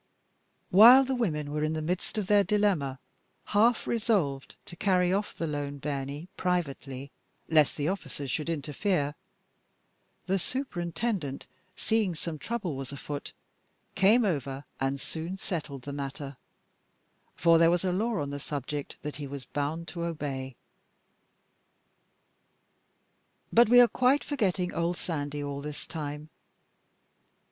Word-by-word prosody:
While 235 Hz, +8 st, +10 dB
the 265 Hz, 0 st, -1 dB
women 155 Hz, -, -1 dB
were 150 Hz, 0 st, -1 dB
in 155 Hz, +1 st, 0 dB
the 160 Hz, -, -2 dB
midst 180 Hz, +6 st, -2 dB
of 210 Hz, -, 0 dB
their 205 Hz, +1 st, +5 dB
dilemma, 190 Hz, -9 st, +1 dB, 0.5 s
half 220 Hz, +3 st, +3 dB
resolved 195 Hz, -, 0 dB
to 175 Hz, -, -9 dB
carry 180 Hz, -1 st, +2 dB
off 205 Hz, +2 st, -1 dB
the 165 Hz, -, -2 dB
"lane 145 Hz, -2 st, -3 dB
bairnie" 140 Hz, +2 st, -4 dB
privately, 140 Hz, -6 st, -2 dB, 0.4 s
lest 155 Hz, -3 st, +4 dB
the 145 Hz, 0 st, -1 dB
officers 155 Hz, -7 st, -3 dB
should 155 Hz, +4 st, -2 dB
interfere, 150 Hz, 0 st, -1 dB, 1.1 s
the 195 Hz, +1 st, +1 dB
superintendent, 175 Hz, -, -3 dB, 0.3 s
seeing 215 Hz, -6 st, 0 dB
some 155 Hz, 0 st, -5 dB
trouble 210 Hz, -8 st, -3 dB
was 135 Hz, -1 st, -5 dB
afoot, 145 Hz, +1 st, -6 dB, 0.6 s
came 215 Hz, +5 st, +5 dB
over 140 Hz, -6 st, -2 dB
and 135 Hz, +1 st, 0 dB
soon 165 Hz, +6 st, -5 dB
settled 155 Hz, -9 st, -5 dB
the 140 Hz, -, -6 dB
matter, 140 Hz, 0 st, -5 dB, 1.0 s
for 165 Hz, -1 st, +5 dB
there 165 Hz, 0 st, +6 dB
was 175 Hz, +2 st, +1 dB
a 185 Hz, -, +2 dB
law 215 Hz, +2 st, 0 dB
on 140 Hz, -1 st, -3 dB
the 145 Hz, -, -4 dB
subject 145 Hz, 0 st, -5 dB
that 150 Hz, -1 st, -5 dB
he 145 Hz, -2 st, -5 dB
was 140 Hz, -1 st, -7 dB
bound 155 Hz, +4 st, -3 dB
to 170 Hz, -2 st, -5 dB
obey. 140 Hz, -6 st, -4 dB, 3.0 s
But 235 Hz, -1 st, +6 dB
we 245 Hz, +1 st, +8 dB
are 245 Hz, -, +9 dB
quite 255 Hz, +4 st, +3 dB
forgetting 195 Hz, -10 st, 0 dB
old 170 Hz, +1 st, 0 dB
Sandy 145 Hz, -3 st, -3 dB
all 140 Hz, 0 st, -4 dB
this 150 Hz, 0 st, -6 dB
time. 150 Hz, -1 st, -6 dB
160 Hz, 135 wpm, -29 LUFS, 145-195 Hz, 3.0 s, While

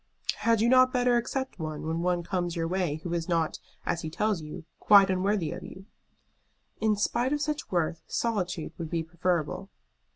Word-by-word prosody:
"Had 230 Hz, -2 st, +2 dB
you 230 Hz, -, +4 dB
not 255 Hz, +1 st, +6 dB
better 250 Hz, -1 st, +3 dB
accept 260 Hz, 0 st, -2 dB
one 155 Hz, -1 st, -4 dB
when 160 Hz, +1 st, -1 dB
one 175 Hz, -1 st, +1 dB
comes 175 Hz, -1 st, -2 dB
your 165 Hz, -1 st, -1 dB
way 180 Hz, -4 st, 0 dB
who 175 Hz, -, -3 dB
is 170 Hz, 0 st, -2 dB
not, 165 Hz, -2 st, 0 dB, 0.3 s
as 170 Hz, -, -1 dB
he 160 Hz, -, -4 dB
tells 210 Hz, +2 st, 0 dB
you, 150 Hz, +1 st, -8 dB
quite 200 Hz, -2 st, +7 dB
unworthy 190 Hz, -2 st, 0 dB
of -, -, -6 dB
you?" 190 Hz, -, -10 dB, 0.9 s
"In 220 Hz, -1 st, +2 dB
spite 240 Hz, +5 st, 0 dB
of 295 Hz, -, 0 dB
such 300 Hz, 0 st, -2 dB
worth 170 Hz, -2 st, 0 dB
solitude 190 Hz, -8 st, -2 dB
would 165 Hz, -2 st, -4 dB
be 165 Hz, -1 st, -1 dB
preferable." 170 Hz, +2 st, -1 dB
185 Hz, 185 wpm, -28 LUFS, 165-220 Hz, 0.9 s, quite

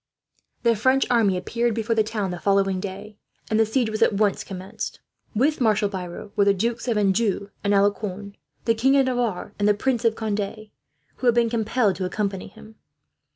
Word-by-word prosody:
The 235 Hz, -1 st, +4 dB
French 260 Hz, +5 st, +3 dB
army 215 Hz, -6 st, +3 dB
appeared 235 Hz, +5 st, -1 dB
before 230 Hz, 0 st, 0 dB
the 220 Hz, -, +4 dB
town 215 Hz, -1 st, -3 dB
on 190 Hz, -, -2 dB
the 175 Hz, -, -5 dB
following 195 Hz, -1 st, +2 dB
day, 200 Hz, +2 st, -7 dB, 0.3 s
and 215 Hz, -, +2 dB
the 225 Hz, -, +4 dB
siege 225 Hz, 0 st, 0 dB
was 215 Hz, -, -4 dB
at -, -, +4 dB
once 205 Hz, -1 st, +1 dB
commenced. 190 Hz, 0 st, -6 dB, 0.4 s
With 275 Hz, +6 st, +1 dB
Marshal 215 Hz, -3 st, +2 dB
Biron 185 Hz, +1 st, -7 dB
were 200 Hz, -, +3 dB
the 200 Hz, 0 st, +4 dB
dukes 230 Hz, +5 st, -2 dB
of 230 Hz, -3 st, +1 dB
Anjou 200 Hz, 0 st, +1 dB
and 200 Hz, -, +1 dB
Alencon, 200 Hz, 0 st, 0 dB, 0.3 s
the 230 Hz, -, +4 dB
King 260 Hz, +5 st, +3 dB
of 270 Hz, -, +4 dB
Navarre, 245 Hz, -7 st, -2 dB
and 205 Hz, -, +2 dB
the 210 Hz, -, +4 dB
Prince 245 Hz, +2 st, 0 dB
of 230 Hz, -1 st, +2 dB
Conde, 215 Hz, 0 st, -4 dB, 0.5 s
who 255 Hz, -, -1 dB
had 235 Hz, -, +5 dB
been 235 Hz, -1 st, +2 dB
compelled 220 Hz, -2 st, +1 dB
to 185 Hz, -, -2 dB
accompany 195 Hz, 0 st, -3 dB
him. 220 Hz, 0 st, -15 dB
215 Hz, 200 wpm, -24 LUFS, 200-230 Hz, 0.5 s, had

